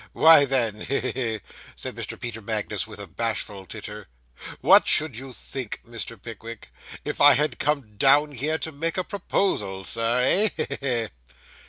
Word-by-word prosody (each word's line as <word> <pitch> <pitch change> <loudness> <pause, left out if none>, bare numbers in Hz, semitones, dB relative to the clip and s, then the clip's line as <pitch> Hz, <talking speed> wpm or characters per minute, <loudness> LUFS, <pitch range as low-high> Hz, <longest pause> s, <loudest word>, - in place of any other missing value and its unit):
'Why, 160 -3 +7
then, 115 -6 +1
he 140 - -1
he 130 - -2
he!' 115 -5 -3 0.3
said - - -6
Mr. - - -6
Peter 115 -2 -6
Magnus, 105 -1 -1
with 110 - -11
a 100 - -6
bashful 100 0 -4
titter, - - -8 0.5
'what - - +6
should 155 -5 +2
you 130 +3 -8
think, 125 -2 -6
Mr. 115 0 -7
Pickwick, 115 0 -10 0.4
if - - -4
I 145 0 +10
had 150 +3 0
come 140 -8 -2
down 145 +5 +5
here 145 +4 -2
to 160 - -5
make 165 +4 -3
a 185 - +1
proposal, 105 - -2
Sir, 115 +4 +1
eh? 210 +11 +4
He, 155 - -1
he, 140 - -4 0.3
he! - - -4
125 Hz, 175 wpm, -24 LUFS, 110-145 Hz, 0.5 s, I